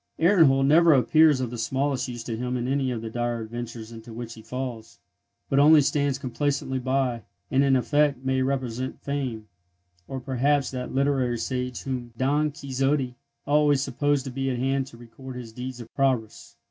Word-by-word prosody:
Ehrenhold 160 -7 +5
never 165 +3 +6
appears 155 +2 +5
of 125 -2 -3
the 120 - -6
smallest 135 +3 -1
use 120 -2 -6
to 115 -1 -4
him 125 +2 -2
in 120 0 -2
any 135 0 0
of 115 -3 -3
the 115 - -4
dire 120 0 -2
adventures 115 0 -7
into 115 0 -10
which 115 0 -7
he 110 - -12
falls, 115 -2 -6 0.5
but 135 - +2
only 155 +2 +7
stands 140 -1 +1
complacently 135 0 -2
by, 130 -2 0 0.3
and 135 +1 +4
in 135 -1 +4
effect 140 0 +1
may 130 0 +1
represent 130 -2 -2
Fame, 130 -6 -3 0.6
or 135 - -4
perhaps 135 +2 +1
that 125 -1 -5
literary 135 -3 +1
sage 125 0 -3
whom 125 -3 -4
Don 145 +4 +2
Quixote 135 -2 -1 0.3
always 145 -2 +3
supposed 145 +1 0
to 135 - -5
be 135 +1 -2
at 125 - -1
hand 135 +1 0
to 115 - -13
record 125 +2 -11
his 120 -3 -8
deeds 125 +1 -6
of 115 -1 -11
prowess. 130 -6 -1
130 Hz, 180 wpm, -25 LUFS, 120-140 Hz, 0.6 s, only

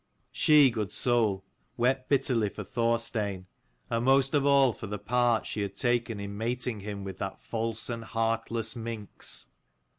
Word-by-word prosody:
She, 150 -4 +6
good 110 -4 -3
soul, 110 -6 +1 0.3
wept 130 +2 +1
[bitterly 125 -6 +2
for 105 - -7
Thorstein, 115 -3 -1 0.4
and 115 0 -1
most 135 +1 +4
of 145 -1 +3
all 135 -3 +5
for 110 - -8
the 105 +1 -4
part 120 +2 +1
she 105 - -3
had 100 -1 -3
taken 120 -2 +1
in 100 0 -5
mating 120 0 -2
him 100 0 -6
with 95 -1 -7
that 95 - -4
false 115 -1 -3
and 115 -1 -4
heartless 115 0 -1
minx. 115 -3 -4
115 Hz, 155 wpm, -29 LUFS, 105-125 Hz, 0.4 s, She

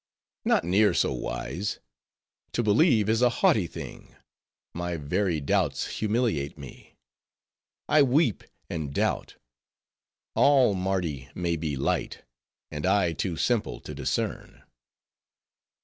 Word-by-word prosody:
"Not - - +3
near 100 +5 +3
so - - +2
wise. 65 +9 -4 0.8
To 120 - 0
believe 110 - +4
is 110 +2 +2
a 125 - +5
haughty 110 -5 +2
thing; - - -10 0.6
my 90 0 -3
very 85 +3 0
doubts 75 -3 0
humiliate 105 - 0
me. 70 -4 -12 0.9
I 155 - +5
weep 135 - +2 0.2
and 75 -5 -5
doubt; - - -1 1.0
all 135 -7 +5
Mardi 90 -8 -2
may 85 -1 -1
be 80 -3 -3
light; 65 - -2 0.5
and 75 0 -5
I 95 -3 +3
too 85 0 -3
simple 120 -4 0
to - - -8
discern." - - -3
95 Hz, 115 wpm, -27 LUFS, 75-110 Hz, 1.0 s, a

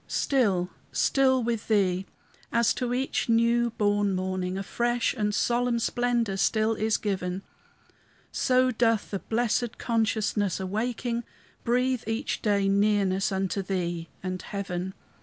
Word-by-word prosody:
Still, 195 -10 +1 0.2
still 260 -2 +3
with 230 -2 -2
Thee! 190 -3 +1 0.4
as 235 -1 +3
to 250 -2 -2
each 255 0 -1
new 235 +1 +3
born 205 -1 +2
morning 185 0 -2
A 195 - -3
fresh 240 +3 0
and 210 -4 0
solemn 240 +1 +1
splendor 235 -3 0
still 220 +3 +2
is 220 0 +1
given, 190 -2 -3 0.9
So 255 0 +3
doth 225 -2 +1
the 195 - -2
blessed 240 +2 -1
consciousness, 215 -4 0
awaking, 235 +5 -2 0.4
Breathe, 250 +1 +1
each 225 +5 -2
day, 200 -2 +2
nearness 200 -1 +2
unto 195 +1 -1
Thee 175 -3 -3
and 185 -1 -3
heaven. 190 -2 -4
215 Hz, 125 wpm, -27 LUFS, 195-240 Hz, 0.9 s, still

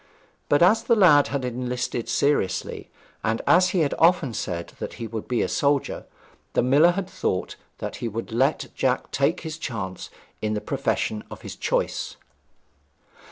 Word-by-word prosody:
But 145 +3 +5
as 215 +5 +5
the 235 0 +3
lad 165 -9 +6
had 135 -2 -2
enlisted 125 -1 -3
seriously, 140 -10 0 0.3
and 110 +1 0
as 180 0 +5
he 175 -1 +1
had 145 - +1
often 165 -7 +4
said 85 -5 -4
that - - -5
he 115 - -6
would 110 -1 -6
be 125 - +1
a - - 0
soldier, 140 -1 0 0.5
the - - +2
miller 145 +7 +5
had 190 0 -3
thought 90 - -2 0.2
that - - -5
he 120 - -3
would 115 +1 -5
let 130 +6 +1
Jack 130 -1 0
take 140 +6 +1
his 160 -1 -6
chance 100 - -5 0.3
in 110 0 -1
the - - 0
profession 105 +1 -1
of - - -9
his - - -8
choice. - - -1
130 Hz, 165 wpm, -24 LUFS, 115-160 Hz, 0.5 s, lad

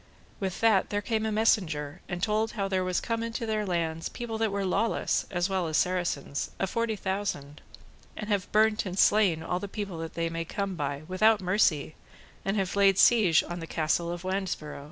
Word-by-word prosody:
With 190 -1 -3
that 220 -5 +4
there 205 0 -1
came 220 0 0
a - - -1
messenger 175 -8 +1
and 175 0 -4
told 220 +1 +1
how 200 -4 -1
there 190 -1 0
was 185 -1 0
come 230 -1 -2
into 230 0 -3
their 215 -2 -1
lands 165 -2 -1
people 230 -2 -5
that 225 -2 +1
were 200 0 -1
lawless 200 +5 0
as 175 0 0
well 190 -3 -1
as 155 - 0
Saracens, 175 -6 -1
a - - +1
forty 230 +3 -1
thousand, 190 -8 -3 0.6
and 210 - -5
have 205 -3 -1
burnt 215 -1 +3
and 185 0 -5
slain 190 -7 +4
all 180 +2 -1
the 200 - -5
people 195 -4 -5
that 165 0 -6
they 165 0 0
may 165 0 -3
come 200 +3 -3
by, 145 -3 -3
without 215 +4 +4
mercy, 180 -6 +1 0.5
and 195 +2 -1
have 195 -1 -1
laid 195 -1 +4
siege 205 -10 +5
on 175 +1 -6
the 165 - -7
castle 165 +2 0
of 175 0 -6
Wandesborow. 185 -6 -3
190 Hz, 200 wpm, -28 LUFS, 170-215 Hz, 0.6 s, siege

